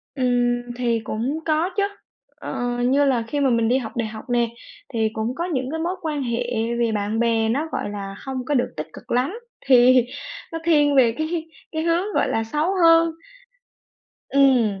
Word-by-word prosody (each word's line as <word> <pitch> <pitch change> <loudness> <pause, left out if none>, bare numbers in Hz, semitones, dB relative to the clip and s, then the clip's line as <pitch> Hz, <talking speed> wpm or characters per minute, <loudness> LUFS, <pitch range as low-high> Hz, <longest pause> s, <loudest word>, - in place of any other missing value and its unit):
Ừm, 245 -2 +1
thì 235 -2 0
cũng 250 +9 -2
có 320 +3 +1
chớ. 400 - +3 0.5
Ờ, 245 0 -3
như 280 +3 +3
là 250 -4 +2
khi 290 +4 -2
mà 275 -2 +3
mình 230 -1 +2
đi 255 - +3
học 230 -4 -4
đại 235 -2 0
học 220 +3 -9
nè, 240 -1 +2 0.5
thì 220 -1 +1
cũng 220 +3 -2
có 340 +4 -2
những 265 -5 -2
cái 320 - -3
mối 350 +3 -1
quan 300 -4 -2
hệ 235 -1 -1 0.4
về 235 -1 +2
bạn 210 +1 -1
bè 225 -1 +2
nó, 290 +7 0
gọi - - -3
là, 195 -1 -6
hông 260 -2 -4
có 295 - -1
được 250 - 0
tích 155 +1 -4
cực - - -12
lắm, 270 - 0 0.3
thì 250 -1 +6 0.5
nó 330 - -4
thiên 295 -3 +4
về 240 -4 +5
cái 320 +1 -2 0.3
cái 315 0 -2
hướng, 345 +5 0
gọi - - +2
là, 225 - 0
xấu 300 +10 -1
hơn 330 0 +6 1.2
ừm. 250 -8 +3
255 Hz, 195 wpm, -22 LUFS, 230-305 Hz, 1.2 s, thì